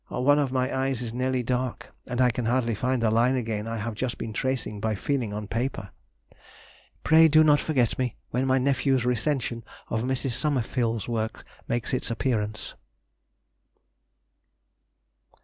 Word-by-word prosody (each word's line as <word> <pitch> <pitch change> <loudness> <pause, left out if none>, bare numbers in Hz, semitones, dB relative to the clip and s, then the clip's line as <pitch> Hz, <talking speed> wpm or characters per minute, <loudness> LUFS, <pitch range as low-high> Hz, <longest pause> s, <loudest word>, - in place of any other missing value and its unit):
One 145 +4 +3
of 140 -3 0
my 130 0 0
eyes 130 -2 -1
is 115 -1 -5
nearly 130 0 0
dark, 125 0 -3
and 125 -1 -3
I 125 -1 +5
can 120 0 -3
hardly 120 0 +1
find 125 +2 0
the 110 - +3
line 120 +4 +3
again 110 -3 -2
I 115 0 -3
have 110 +2 -3
just 120 +3 -3
been 110 - -5
tracing 130 -3 -2
by 110 0 -1
feeling 125 0 -1
on 105 0 -5
paper. 115 -3 -3 1.1
Pray 160 0 +7
do 155 0 +6
not 150 -1 +5
forget 130 -8 0
me 125 -3 -1 0.2
when 130 +2 0
my 130 0 +3
nephew's 130 -1 +1
recension 125 -1 -1 0.3
of 110 - -1
Mrs. 130 +1 -1
Somerville's 120 -5 0
works 110 -2 -3 0.2
makes 120 +2 -2
its 125 - -1
appearance.... 110 -3 -2
125 Hz, 155 wpm, -26 LUFS, 115-130 Hz, 1.1 s, Pray